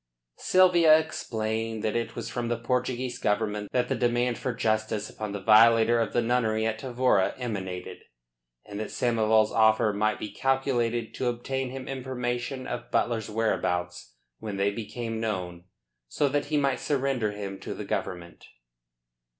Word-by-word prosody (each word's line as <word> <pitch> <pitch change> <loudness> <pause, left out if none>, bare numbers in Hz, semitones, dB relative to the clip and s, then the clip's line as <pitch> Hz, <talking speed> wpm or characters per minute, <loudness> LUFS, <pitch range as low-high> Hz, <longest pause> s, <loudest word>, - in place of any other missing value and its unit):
Sylvia 175 -4 +6
explained 110 -7 -3
that 110 - -1
it 115 -1 -2
was 115 -1 -5
from 120 +2 -3
the 120 0 -1
Portuguese 125 +1 -2
Government 105 0 -1
that 125 -1 +1
the - - 0
demand 120 0 0
for 130 - -2
justice 110 -2 -1
upon 105 -2 -5
the 100 - -4
violator 115 +1 +6
of 115 - 0
the 120 - +1
nunnery 110 -2 +1
at 110 0 -1
Tavora 125 -6 +1
emanated, 95 -7 -5 0.6
and 100 0 -7
that 110 - -4
Samoval's 110 -2 +2
offer 110 -1 +4
might 105 +1 +1
be 105 - -6
calculated 120 -3 0
to 130 - -2
obtain 130 +2 -2
him 130 0 -7
information 130 -1 -3
of 120 - -5
Butler's 115 -3 0
whereabouts 90 - -2 0.2
when 105 -3 -5
they 100 +1 +2
became 115 +1 -5
known, 90 -5 -4 0.4
so 140 - 0
that 145 +1 0
he 150 +1 0
might 140 -2 +1
surrender 135 -6 0
him 100 -1 -6
to - - -6
the - - -6
Government. 85 -1 -5
115 Hz, 155 wpm, -27 LUFS, 105-125 Hz, 0.6 s, Sylvia